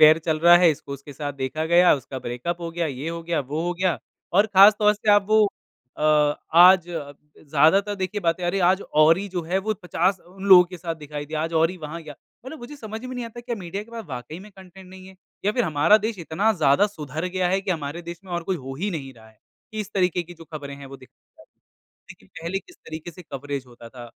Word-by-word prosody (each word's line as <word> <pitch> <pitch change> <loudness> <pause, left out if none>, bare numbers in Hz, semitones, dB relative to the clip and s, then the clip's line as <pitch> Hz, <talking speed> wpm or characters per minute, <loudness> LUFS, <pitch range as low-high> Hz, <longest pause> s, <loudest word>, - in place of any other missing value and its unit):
Affair 155 +1 +8
चल 160 -1 +1
रहा 175 +1 +8
है 175 -1 +5
इसको 140 -2 -6
उसके 140 +1 -9
साथ 145 +1 -5
देखा 140 +3 -3
गया 175 +2 +5
उसका 135 -1 -7
ब्रेकअप 125 +9 -4
हो 170 -1 -5
गया, 170 0 -2
ये 140 +1 -5
हो 165 0 -5
गया, 165 -1 -1
वो 145 +3 -4
हो 175 +1 -1
गया 180 -1 0 0.3
और 200 +4 +4
ख़ासतौर 210 +1 +6
से 210 0 0
आप 205 -1 +4
वो 215 -1 +5 0.5
अ, 150 -1 +3 0.2
आज 180 +1 +8
ज़्यादातर 155 +4 0
देखिए 190 +1 -3
बातें 170 0 0
अरे! 175 +3 0
आज 185 +2 +3 0.2
ओरि 165 +6 +4
जो 180 -2 -3
है 175 +4 -1
वो 215 +3 -2
50 180 +2 +1 0.2
लोगों 190 -2 +8
के 180 +1 -10
साथ 165 0 -4
दिखाई 150 -1 -7
दिया 155 +1 -3
आज 165 +1 -3
ओरि 165 +3 +2
वहाँ 165 0 -7
गया 150 -2 -10 0.3
मतलब 315 +4 -8
मुझे 265 +4 -10
समझ 220 -2 -8
में 255 0 -6
नहीं 245 -1 -4
आता 230 +1 -9
क्या 240 0 -4
मीडिया 190 +1 -6
के 225 - -17
पास 230 -1 -7
वाक़ई 125 +4 -7
में 210 +2 -13
कंटेंट 190 0 -14
नहीं 185 0 -13
है? 190 - -14 0.3
या 205 - +2
फ़िर 245 +1 +1
हमारा 155 +5 +4
देश 220 -1 -3
इतना 175 +6 0
ज़्यादा 175 0 +3
सुधार 155 -5 -6
गया 185 0 -1
है 190 +2 +1
कि 195 0 -4
हमारे 160 0 -3
देश 170 0 -8
में 185 - -10
और 175 0 -2
कोई 185 +2 -2
हो 135 -2 -8
ही 205 +2 -1
नहीं 140 -7 -6
रहा 110 -1 -17
है 110 -1 -24 0.3
कि 215 - -3
इस 210 - -6
तरीक़े 180 -2 +1
की 175 +1 -13
जो 165 -1 -14
ख़बरें 145 -3 -8
हैं 140 0 -11
वो 135 0 -10
दिखाई 130 - -19 0.2
जाती - - -21
हैं। - - -56 0.5
लेकिन 95 - -15
पहले 170 +3 -2
किस 350 - -18
तरीक़े 160 +2 -9
से 180 - -12
कवरेज़ 140 -3 -6
होता 120 -1 -13
था। 120 0 -11
170 Hz, 245 wpm, -23 LUFS, 150-195 Hz, 0.5 s, Affair